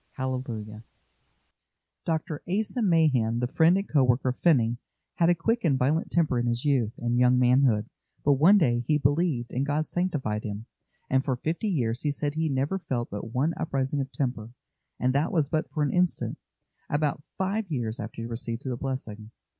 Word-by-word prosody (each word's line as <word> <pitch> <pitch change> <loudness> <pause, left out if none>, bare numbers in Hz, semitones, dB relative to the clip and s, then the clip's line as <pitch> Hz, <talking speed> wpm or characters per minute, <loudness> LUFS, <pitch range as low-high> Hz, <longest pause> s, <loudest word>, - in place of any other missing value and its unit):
Hallelujah! 120 -5 -4 1.2
Dr. 160 -2 -2
Asa 215 +6 -1
Mahan, 150 - +3
the 125 - 0
friend 165 +7 +4
and 195 - -2
co 145 -3 +3
worker 125 +1 +2
of 125 - -4
Finney, 120 -8 +3 0.4
had 170 0 +4
a 175 - +4
quick 225 +8 0
and 145 -6 +3
violent 145 +6 +1
temper 155 -8 +1
in 120 - -1
his 120 +2 -1
youth 125 -6 +1
and 120 +1 0
young 125 0 +5
manhood; 125 -3 +3 0.4
but 145 - +5
one 165 +10 +6
day 120 -9 +2
he 150 - +3
believed, 145 -3 0
and 130 - -1
God 145 +2 0
sanctified 150 -14 -2
him, 105 +1 -5 0.4
and 130 0 +2
for 130 -3 0
fifty 165 - -2
years 125 - 0
he 150 - 0
said 145 0 -2
he 160 0 0
never 140 +8 -1
felt 120 -8 -3
but 105 +2 -6
one 140 +7 +1
uprising 140 -1 -1
of 135 0 -5
temper, 125 -4 -3 0.5
and 125 0 +1
that 145 +5 +1
was 155 -5 +1
but 155 0 0
for 150 - -1
an 145 - 0
instant, 180 -1 0 0.5
about 145 -1 0 0.2
five 195 +1 -1
years 120 -5 -3
after 115 - -6
he - - -4
received 115 +1 -4
the 130 -2 -2
blessing. 115 -5 -5
135 Hz, 185 wpm, -27 LUFS, 120-160 Hz, 1.2 s, one